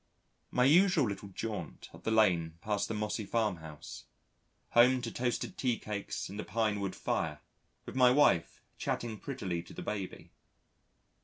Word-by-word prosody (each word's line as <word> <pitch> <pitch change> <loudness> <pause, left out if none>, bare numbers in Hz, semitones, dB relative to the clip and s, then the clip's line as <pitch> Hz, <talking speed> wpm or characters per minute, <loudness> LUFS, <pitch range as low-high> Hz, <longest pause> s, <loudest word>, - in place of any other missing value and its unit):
My 125 - +2
usual 170 -1 +5
little 100 0 -5
jaunt 100 -5 -5
up - - -14
the - - +1
lane 90 -7 +3
past 105 +2 -1
the 110 - -3
mossy 105 +1 -2
farm 105 -3 0
house. 80 -2 -10 0.7
Home 125 +2 +6
to 115 - -3
toasted 120 -1 -2
tea 125 -3 +1
cakes 105 -2 -4
and 100 +2 -8
a - - -2
pinewood 105 -4 -1
fire, 75 -2 -1 0.5
with - - -8
my 125 -1 +6
wife 125 - +3 0.2
chattering 110 -3 -2
prettily 95 -11 -3
to - - -13
the - - -6
baby. 100 -3 -5
105 Hz, 155 wpm, -32 LUFS, 95-120 Hz, 0.7 s, Home